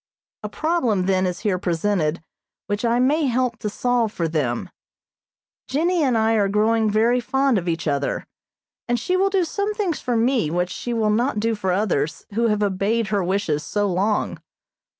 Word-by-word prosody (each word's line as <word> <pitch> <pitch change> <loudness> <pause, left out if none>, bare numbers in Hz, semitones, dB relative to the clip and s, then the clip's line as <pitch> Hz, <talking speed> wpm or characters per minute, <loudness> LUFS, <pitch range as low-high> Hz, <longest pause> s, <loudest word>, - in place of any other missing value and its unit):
A 210 - -5
problem 245 - 0
then 190 -1 +2
is 180 -1 -4
here 190 -4 0
presented 170 -2 0 0.4
which 205 +2 -3
I 235 0 +2
may 285 +4 +2
help 245 -2 0
to 210 - -3
solve 240 0 0
for 170 -5 -2
them. 145 -7 -2 1.0
Jennie 335 +5 +1
and 255 -5 +2
I 220 0 +2
are 205 -3 +2
growing 215 +2 +2
very 230 +4 +3
fond 265 -1 +1
of 175 - -8
each 165 0 -2
other, 140 -1 -1 0.6
and 240 0 +1
she 360 +11 -1
will 385 +1 +3
do 390 -2 +2
some 405 +5 -2
things 385 -7 -1
for 245 -3 -1
me 235 - +2
which 180 +2 -1
she 240 - -5
will 220 -2 +1
not 235 +1 +1
do 225 +2 +1
for 195 -4 -1
others 180 -6 -1
who 230 +2 +2
have 210 -1 +1
obeyed 205 +3 0
her 200 -2 +1
wishes 180 -5 0
so 205 +7 -1
long. 200 +3 0
215 Hz, 185 wpm, -22 LUFS, 185-245 Hz, 1.0 s, very